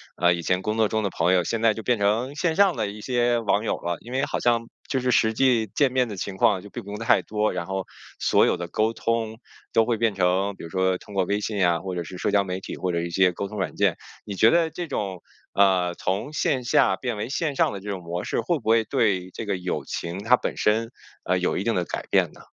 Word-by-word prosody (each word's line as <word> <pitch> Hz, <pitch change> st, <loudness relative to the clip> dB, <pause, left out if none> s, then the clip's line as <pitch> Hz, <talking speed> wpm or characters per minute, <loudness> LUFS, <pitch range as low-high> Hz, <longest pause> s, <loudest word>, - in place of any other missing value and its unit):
呃， 90 Hz, 0 st, +3 dB
以 85 Hz, -, -6 dB
前 90 Hz, 0 st, +1 dB
工 110 Hz, +2 st, -2 dB
作 110 Hz, -1 st, +3 dB
中 110 Hz, +1 st, -1 dB
的 100 Hz, -, -1 dB
朋 90 Hz, +1 st, +1 dB
友， 90 Hz, -2 st, +3 dB
现 115 Hz, -1 st, -2 dB
在 115 Hz, -2 st, +5 dB
就 110 Hz, -, -6 dB
变 120 Hz, +1 st, +1 dB
成 110 Hz, +7 st, 0 dB
线 165 Hz, 0 st, 0 dB
上 195 Hz, -4 st, +4 dB
的 110 Hz, -3 st, -1 dB
一 105 Hz, +1 st, -8 dB
些 120 Hz, -1 st, +1 dB
网 105 Hz, -1 st, +1 dB
友 -, -, -1 dB
了。 85 Hz, -1 st, -3 dB
因 120 Hz, -, -11 dB
为 135 Hz, +2 st, 0 dB
好 -, -, -2 dB
像 115 Hz, -1 st, +1 dB, 0.2 s
就 130 Hz, -, 0 dB
是 125 Hz, 0 st, -1 dB
实 110 Hz, -2 st, +3 dB
际 120 Hz, -2 st, +3 dB
见 140 Hz, -3 st, +3 dB
面 125 Hz, -1 st, +2 dB
的 105 Hz, -, -6 dB
情 95 Hz, +1 st, -5 dB
况 95 Hz, -, +3 dB
就 105 Hz, -, -12 dB
并 -, -, -7 dB
不 100 Hz, -, -11 dB
用 105 Hz, -, -5 dB
太 115 Hz, -, +3 dB
多， 105 Hz, 0 st, 0 dB
然 85 Hz, -, -3 dB
后 95 Hz, 0 st, -3 dB, 0.3 s
所 -, -, +4 dB
有 -, -, +1 dB
的 85 Hz, -, -5 dB
沟 110 Hz, +6 st, 0 dB
通 115 Hz, -1 st, -2 dB, 0.3 s
都 115 Hz, -, +4 dB
会 115 Hz, -1 st, 0 dB
变 115 Hz, -1 st, +1 dB
成， 95 Hz, +1 st, +1 dB
比 -, -, -11 dB
如 85 Hz, -, -7 dB
说 95 Hz, +1 st, +1 dB
通 100 Hz, -, -12 dB
过 95 Hz, -, +3 dB
微 100 Hz, +3 st, 0 dB
信 105 Hz, 0 st, -3 dB
呀， 85 Hz, -3 st, +3 dB
或 95 Hz, +1 st, -5 dB
者 85 Hz, -, -2 dB
是 90 Hz, +3 st, -9 dB
社 -, -, 0 dB
交 100 Hz, -1 st, +3 dB
媒 95 Hz, 0 st, -4 dB
体 -, -, -7 dB
或 90 Hz, -, -1 dB
者 85 Hz, -1 st, -1 dB
一 85 Hz, -, -3 dB
些 90 Hz, +1 st, +3 dB
沟 100 Hz, +3 st, -4 dB
通 105 Hz, -, -8 dB
软 95 Hz, -, -2 dB
件。 -, -, +2 dB, 0.3 s
你 100 Hz, -, -6 dB
觉 110 Hz, +4 st, +5 dB
得 165 Hz, +2 st, +3 dB
这 170 Hz, +2 st, -5 dB
种， 95 Hz, -, -3 dB, 0.3 s
呃， 95 Hz, -3 st, +3 dB
从 105 Hz, +11 st, -2 dB
线 130 Hz, -4 st, 0 dB
下 105 Hz, -5 st, +3 dB
变 120 Hz, -1 st, -3 dB
为 110 Hz, -, -4 dB
线 145 Hz, 0 st, -1 dB
上 -, -, +2 dB
的 100 Hz, -, -5 dB
这 100 Hz, +2 st, -8 dB
种 95 Hz, -2 st, -4 dB
模 85 Hz, +1 st, -4 dB
式， -, -, -1 dB
会 175 Hz, -, 0 dB
不 110 Hz, -, -4 dB
会 115 Hz, 0 st, +5 dB
对 105 Hz, -7 st, 0 dB
这 110 Hz, -, -6 dB
个 100 Hz, -, -1 dB
友 90 Hz, 0 st, -3 dB
情 85 Hz, +2 st, -4 dB
它 120 Hz, +3 st, +6 dB
本 -, -, -4 dB
身， 110 Hz, +2 st, +1 dB, 0.3 s
啊， 90 Hz, +1 st, +1 dB
有 90 Hz, -, 0 dB
一 95 Hz, -, -1 dB
定 115 Hz, +1 st, 0 dB
的 90 Hz, -, 0 dB
改 -, -, -5 dB
变 -, -, +3 dB
呢？ -, -, -15 dB
105 Hz, 300 characters per minute, -24 LUFS, 95-115 Hz, 0.3 s, 它